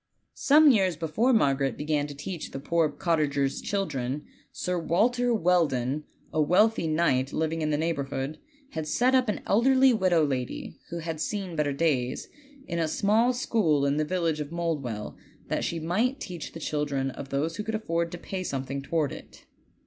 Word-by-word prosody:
Some 300 +1 +6
years 190 -7 +2
before 165 - +1
Margaret 135 - +2
began 150 -1 0
to 145 - -8
teach 165 +4 -6
the 135 - -6
poor 165 +2 +1
cottagers' 145 -4 0
children 145 -8 -2 0.3
Sir 180 -1 -2
Walter 245 +9 +2
Welldon, 155 - +1 0.3
a 155 - +2
wealthy 180 +4 +3
knight 150 -5 +1
living 160 +1 -1
in 155 - 0
the 150 - +1
neighborhood, 140 -3 -2 0.3
had 160 -1 -4
set 250 +11 +2
up 255 -3 +3
an 210 - -2
elderly 260 +4 +4
widow 185 -7 +3
lady, 130 -3 -4
who 170 - -4
had 165 -1 -4
seen 195 -4 -3
better 150 -2 +1
days, 135 -4 0 0.4
in 170 - -2
a 165 - +1
small 215 +9 +2
school 200 - +1
in 140 +1 +1
the 155 - +2
village 165 -2 -1
of 150 -1 -4
MouldweJl, 150 -11 -3 0.3
that - - -1
she 170 - -2
might 220 - 0
teach 175 -4 -6
the 165 - -7
children 145 -3 -1
of 135 - -8
those 150 +5 -1
who 210 - -3
could 220 0 -3
afford 170 -6 -1
to 175 - -5
pay 185 +2 -5
something 135 -3 -3
toward 150 -1 0
it. - - -11
165 Hz, 175 wpm, -27 LUFS, 145-190 Hz, 0.4 s, Some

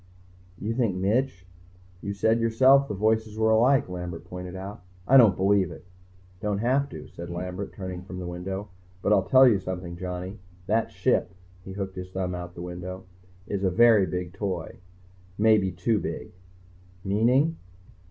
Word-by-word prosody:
_ - - -29 0.5
"You 105 +5 -3
think 115 -6 0
Mitch 100 +1 0 0.3
" 90 0 -27
"You 100 - -4
said 110 +3 +2
yourself 130 +5 +5
the 105 - -4
voices 110 +1 0
were 110 0 +3
alike." 125 +5 +4
Lambert 90 -2 -6
pointed 90 +1 -7
out. 95 +1 -7 0.3
"I 135 - +5
don't 115 -8 +7
believe 95 -1 +3
it." 85 +1 -11 0.5
"Don't 105 +1 -1
have 130 +6 +1
to," - - -9
said 85 0 -9
Lambert, 90 +3 -5
turning 95 -2 -6
from 90 0 -9
the 90 - -5
window. 95 +3 -5 0.3
"But 105 - +3
I'll 95 -2 +2
tell 130 0 +8
you 110 -5 +4
something, 90 -2 -5
Johnny. 90 +2 -5 0.3
That 110 +3 +1
Ship 95 -2 0 0.2
" 90 0 -27
he 95 - -7
hooked 95 -1 -5
his 90 0 -6
thumb 95 -1 -3
out 90 0 -7
the 85 - -7
window 90 +1 -7 0.4
"is 100 -1 -3
a 95 - +3
very 110 0 +5
big 90 -1 -4
toy. 95 -6 -4 0.6
Maybe 105 -3 +4
too 95 +5 0
big." - - -5 0.7
"Meaning?" 125 +11 +2
95 Hz, 175 wpm, -26 LUFS, 90-110 Hz, 0.7 s, tell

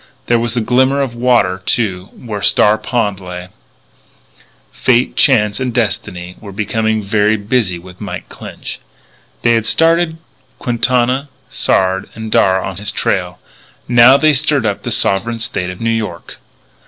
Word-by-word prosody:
There 120 -2 +2
was 120 +1 -2
a - - +2
glimmer 130 +4 +2
of 135 -4 -1
water, 120 -7 +1
too, 95 -6 -1
where 105 -4 -6
Star 105 +3 +3
Pond 105 -3 -1
lay. 90 -1 -8 1.2
Fate, 125 -1 +1
Chance, 105 -6 +3
and 130 -1 -2
Destiny 95 -6 -2
were 100 -3 -10
becoming 110 +2 -1
very 105 +2 +2
busy 105 -3 0
with 90 +1 -14
Mike - - -6
Clinch. - - -9 0.6
They 120 - +4
had 115 -1 +1
started 165 0 +2 0.4
Quintana, 125 +3 0 0.2
Sard, 95 0 0
and 110 -1 -7
Darragh 95 -2 +3
on - - -5
his 105 +1 -2
trail. 90 -4 -1 0.5
Now 120 +2 +7
they 155 +1 +3
stirred 145 -3 +1
up 100 -2 -1
the - - -5
sovereign 115 +5 +1
State 95 -5 -3
of 90 - -8
New 115 0 0
York. 105 -7 -5
110 Hz, 150 wpm, -15 LUFS, 95-125 Hz, 1.2 s, Now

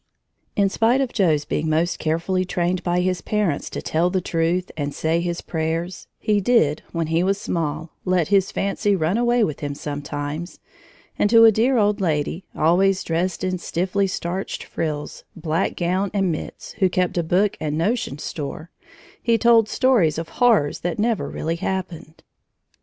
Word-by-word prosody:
In 200 -1 +3
spite 225 +6 +2
of 265 -3 -1
Joe's 160 -8 +2
being 160 +1 -1
most 165 +3 +1
carefully 165 +4 0
trained 180 0 -1
by 175 0 0
his 185 -1 0
parents 205 -9 -1
to - - -6
tell 165 +3 +1
the 185 +1 0
truth 175 +1 -1
and 145 -2 -3
say 165 +1 0
his 175 0 -3
prayers, 165 +2 -3
he 210 -1 +1
did, 175 -9 +3
when 165 -1 -1
he 165 +2 +1
was 195 +2 +1
small, 160 -1 -3
let 180 -3 +1
his 195 -1 +3
fancy 200 +1 0
run 165 +1 0
away 240 0 +2
with 155 -8 -2
him 145 -1 -4
sometimes, 145 +3 -5 0.6
and 205 - +3
to 230 0 +7
a 225 - +8
dear 240 +5 +2
old 210 -2 +2
lady, 160 +1 -1
always 185 +4 +3
dressed 170 +3 -1
in 185 -1 -1
stiffly 190 +4 -1
starched 185 0 -4
frills, 150 -2 -4
black 165 +1 -1
gown 185 +3 0
and 195 -3 +2
mitts, 155 - -6
who 190 -3 +4
kept 180 0 0
a 175 - +2
book 190 +5 +1
and 150 0 -2
notion 190 - -1
store, 155 +2 -6 0.5
he 230 -1 +2
told 225 -1 +4
stories 225 - +3
of 165 -1 -4
horrors 225 - +2
that 175 -1 -3
never 225 0 0
really 165 +2 -3
happened. 175 -4 -5
180 Hz, 170 wpm, -22 LUFS, 160-200 Hz, 0.6 s, a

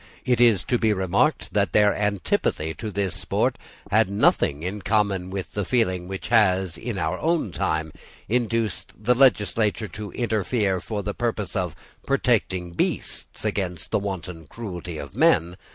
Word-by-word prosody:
It 125 -2 +2
is 115 -7 +5
to 120 - 0
be 110 -2 +3
remarked 95 - +1
that 100 -4 +1
their 105 -1 +5
antipathy 95 -5 0
to 105 +8 -6
this 100 -2 -1
sport - - -1 0.3
had 110 -1 +4
nothing 80 -6 +2
in 100 +3 -4
common 100 -2 +1
with 95 0 -5
the 105 - -2
feeling 95 -5 0
which 95 0 -6
has, 95 -6 +3
in 115 +2 -5
our 80 +2 -1
own 160 - 0
time, 80 -1 -1 0.4
induced 115 -3 -1
the 110 +4 +2
legislature 115 -4 +3
to 105 -2 -7
interfere 105 -4 0
for 105 -2 -4
the 105 +1 -3
purpose 110 -4 -2
of 90 -3 -1 0.3
protecting 105 -10 +1
beasts 85 - -3
against 90 -4 -2
the - - +2
wanton 90 -5 -5
cruelty 90 -5 -6
of 70 -2 -8
men. 85 +2 +3
100 Hz, 155 wpm, -24 LUFS, 90-110 Hz, 0.4 s, is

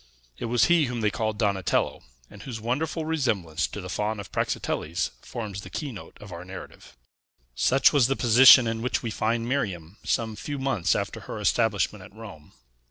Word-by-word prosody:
It - - -4
was 120 0 +2
he 170 -3 +4
whom 120 -2 -4
they 105 -1 +2
called 110 +1 -2
Donatello, 100 -4 0 0.3
and 105 - -14
whose 115 0 -6
wonderful 150 +8 -2
resemblance 100 - -1
to 105 - -7
the 90 - -7
Faun 105 +3 -2
of 100 - -9
Praxiteles 85 +3 -2
forms 105 -4 -6
the - - -10
keynote 135 - -7
of 100 -2 -11
our 85 0 -7
narrative. 95 -8 -11 0.6
Such 125 - +3
was 135 -5 +4
the 135 - 0
position 125 +1 +8
in 115 0 -2
which 125 +2 -1
we 115 - -3
find 115 +2 -1
Miriam 95 - -3
some 110 -2 -1
few 145 +7 -5
months 135 -10 0
after - - -3
her - - -7
establishment 105 -3 +1
at 100 - -15
Rome. 100 -9 -12
110 Hz, 180 wpm, -26 LUFS, 100-125 Hz, 0.6 s, position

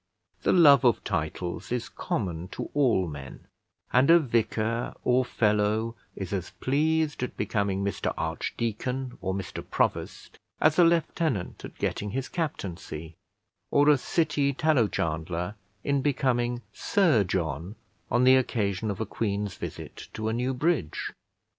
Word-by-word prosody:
The - - +2
love 145 -6 +7
of 120 -3 +3
titles 85 +6 -3
is 125 -2 -1
common 90 -4 -3
to - - -5
all 120 -11 +3
men, 70 -4 -9 0.5
and 130 +4 +5
a 170 - +9
vicar 115 -4 0
or 125 +1 +3
fellow 110 0 +1 0.2
is 95 -1 -5
as 95 -3 -2
pleased 155 +2 +1
at 125 - -4
becoming 100 -2 0
Mr 100 -2 -1
Archdeacon 125 +3 -3
or 95 0 -1
Mr 100 -2 -5
Provost, - - -2 0.2
as 155 +2 +3
a - - +8
lieutenant 165 - +1
at - - -9
getting 105 - -2
his 130 +5 -3
captaincy, 85 - -4 0.6
or 145 +1 +4
a 150 - +6
city 150 -2 +1
tallow 140 -5 +3
chandler 85 +2 -2 0.3
in 140 -1 +1
becoming 125 -3 0
Sir 165 - +3
John 85 0 -2 0.3
on 120 +2 +3
the 130 +1 +7
occasion 105 -5 0
of 100 +1 -3
a - - 0
Queen's 100 -2 -2
visit - - -8
to 110 0 -2
a - - -1
new 125 +3 -1
bridge. 140 - -1
115 Hz, 140 wpm, -27 LUFS, 100-140 Hz, 0.6 s, a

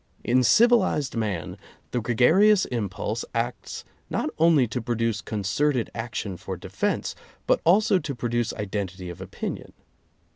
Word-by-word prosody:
In 125 +2 +3
civilized 185 - +4
man, 100 -8 -3 0.3
the 125 - -1
gregarious 170 - +4
impulse 110 -1 -3
acts 115 -2 -3 0.2
not - - -1
only 160 -6 +5
to 125 +3 -3
produce 115 -2 -1
concerted 120 +5 -1
action 110 -4 -4
for - - -6
defense, - - -2 0.3
but - - +2
also 190 +2 +4
to 140 -6 -5
produce 120 -1 -1
identity 95 -3 -4
of 90 +2 -10
opinion. 95 0 -6
120 Hz, 125 wpm, -25 LUFS, 105-145 Hz, 0.3 s, only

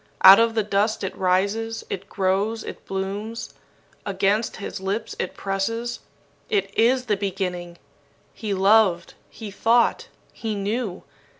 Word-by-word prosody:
Out 190 +2 +11
of 230 0 +2
the 220 - +2
dust 205 +2 0
it 190 - -3
rises, 200 +5 0
it 195 +1 -6
grows, 200 +3 0
it - - -9
blooms. 200 +4 -4 0.5
Against 200 +3 0
his 200 - -6
lips 200 +4 -3
it 185 - -3
presses. 230 +5 -2 0.5
It 420 -3 -1
is 250 +3 +3
the 215 -3 +1
beginning! 180 -3 -3 0.6
He 215 -2 -5
loved, 195 -2 +3 0.2
he 215 -3 -9
thought, 230 +4 +2 0.3
he 220 -2 -4
knew. 205 -1 -3
205 Hz, 130 wpm, -23 LUFS, 190-225 Hz, 0.6 s, Out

